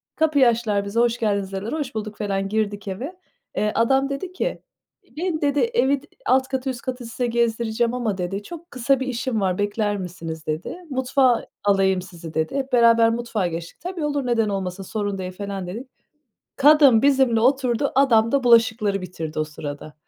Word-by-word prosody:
Kapıyı 300 -5 +4
açtılar, 220 -4 +1
bize, 200 +3 -1
"Hoş 235 0 +2
geldiniz" 200 -3 0
dediler. 195 +4 -4
Hoş 290 -6 -4
bulduk 215 -1 -5
felan 195 -2 -2
girdik 205 -1 -2
eve. 250 - -5 0.4
Eee, 210 0 +1
adam 270 +4 +2
dedi 280 +7 -4
ki, - - -3 0.6
"Beni" 335 -1 -2
dedi 290 -1 +1
"Evi 285 - +2 0.2
alt 260 0 +3
katı 265 0 -2
üst 245 -3 -5
katı 250 -2 -5
size 235 +2 -2
gezdireceğim 235 0 0
ama" 230 -6 -1
dedi 195 +3 -3
"Çok 340 +6 -10
kısa 260 +1 +1
bir 260 - -3
işim 245 -3 -2
var, 185 -2 0
bekler 205 0 0
misiniz?" 165 -4 -7
dedi. 155 - -3
"Mutfağa 260 -2 +2 0.2
alayım 195 -2 +3
sizi," 170 -3 -10
dedi. 160 - -1
Hep 270 -1 -3
beraber 230 -1 +6
mutfağa 230 -4 -1
geçtik. 170 +4 -7
"Tabii 350 -2 -4
olur 290 -2 -1
neden 230 -3 +1
olmasın 195 -1 -3
sorun 205 0 -3
değil," 185 -1 -5
felan 195 -1 -5
dedik. 225 +9 -6 0.7
Kadın 280 -5 +6
bizimle 265 -4 +3
oturdu. 260 +2 +2
Adam 230 -5 +4
da 280 -1 +2
bulaşıkları 225 -4 +3
bitirdi 165 -4 -5
o - - +2
sırada. 150 0 -8
230 Hz, 175 wpm, -23 LUFS, 195-265 Hz, 0.7 s, beraber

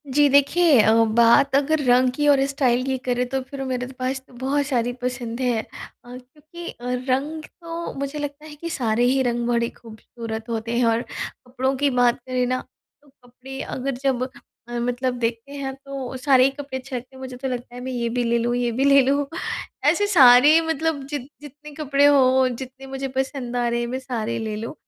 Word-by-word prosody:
जी 295 0 +6
देखिए 285 +1 +4
अ, 220 +1 +4
बात 235 +5 +4
अगर 295 +2 +2
रंग 250 +1 +4
की 295 +1 +1
और 275 -2 +5
स्टाइल 255 -3 +1
की 265 -1 -1
करें 250 0 0
तो 265 +1 -1
फिर 270 +1 -7
मेरे 250 -1 -3
पास 260 +1 -1
तो - - -20
बहुत 270 +4 -1
सारी 245 -3 0
पसंद 245 -1 -4
है। 245 -3 +1
अ, - - -18 0.5
क्योंकि 305 +7 -12
अ, 240 - -11 0.2
रंग 295 +5 -1 0.2
तो 335 0 -5
मुझे 280 +2 -4
लगता 290 +1 -6
है 300 -1 -10
कि 335 +3 -6
सारे 240 -6 0
ही 265 +2 +3
रंग 240 -1 -1
बड़े 235 -1 +1
खूबसूरत 225 0 -9
होते 230 +1 -2
हैं 245 - +3
और 230 0 +2
कपड़ों 260 +2 -3
की 285 +1 +2
बात 245 -1 +2
करें 255 -1 0
ना 255 0 -1 0.4
तो 290 - -24
कपड़े 260 0 -12
अगर 270 +2 -3
जब 265 -3 +1 0.5
अ, 240 0 -3
मतलब 245 +1 -1
देखते 230 +2 -3
हैं 275 -2 -4
तो 270 -2 -6
सारे 260 -1 +4
ही 270 - +4
कपड़े 275 -1 -6
अच्छे 260 0 -7
लगते 250 +2 -7
हैं। - - -12
मुझे 255 -1 -7
तो 265 - -4
लगता 245 -1 -5
है 245 - -7
मैं 260 - -5
ये 240 -2 -2
भी 245 +1 -1
ले 235 0 +1
लूँ 240 +1 0
ये 245 -1 0
भी 250 +4 -1
ले 280 0 +7
लूँ। 280 +2 +1 0.6
ऐसे 410 - +2
सारे 290 -3 +7
मतलब 320 -2 -1
जित 280 -3 -5
जितने 295 +1 -12
कपड़े 285 -1 +2
हों, 260 -2 +5
जितने 260 +1 -9
मुझे 270 0 -4
पसंद 265 -2 -3
आ 240 -1 +1
रहे 235 0 0
हैं, 240 - -2
मैं 260 +2 -3
सारे 235 -3 -3
ले 220 -1 -3
लूँ। 230 +7 -5
260 Hz, 210 wpm, -23 LUFS, 240-280 Hz, 0.6 s, ले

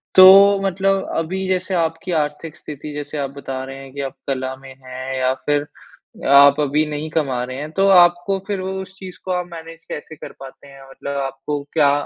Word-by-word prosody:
तो, 195 +1 +9
मतलब 195 +1 0
अभी 185 +4 -2
जैसे 185 0 -1
आपकी 165 +2 -1
आर्थिक 150 +2 -5
स्थिति, 150 0 -9
जैसे 150 +1 -6
आप 140 -1 -2
बता 130 -1 -5
रहे 135 0 -8
हैं 135 -1 -11
कि 140 - -5
आप 135 -1 -5
कला 130 -1 -2
में 135 0 -12
हैं 130 +1 -6
या 130 0 +2
फिर 145 0 +1 0.6
आप 140 +1 +7
अभी 150 +2 +1
नहीं 150 +1 -4
कमा 135 -6 -1
रहे 130 +1 -6
हैं, 150 +2 -6
तो 195 +3 +2
आपको 175 +1 +4
फ़िर 200 -2 -2
उ 190 +1 -4
उस 190 0 -11
चीज़ 185 -2 -9
को 185 - -3
आप 180 -1 -1
मैनेज़ 165 0 -10
कैसे 155 +1 -7
कर - - -10
पाते 135 +1 -12
हैं, 135 0 -14
मतलब 140 +1 -6
आपको 140 +2 -4
क्या 145 -3 +4
150 Hz, 205 wpm, -20 LUFS, 135-180 Hz, 0.6 s, तो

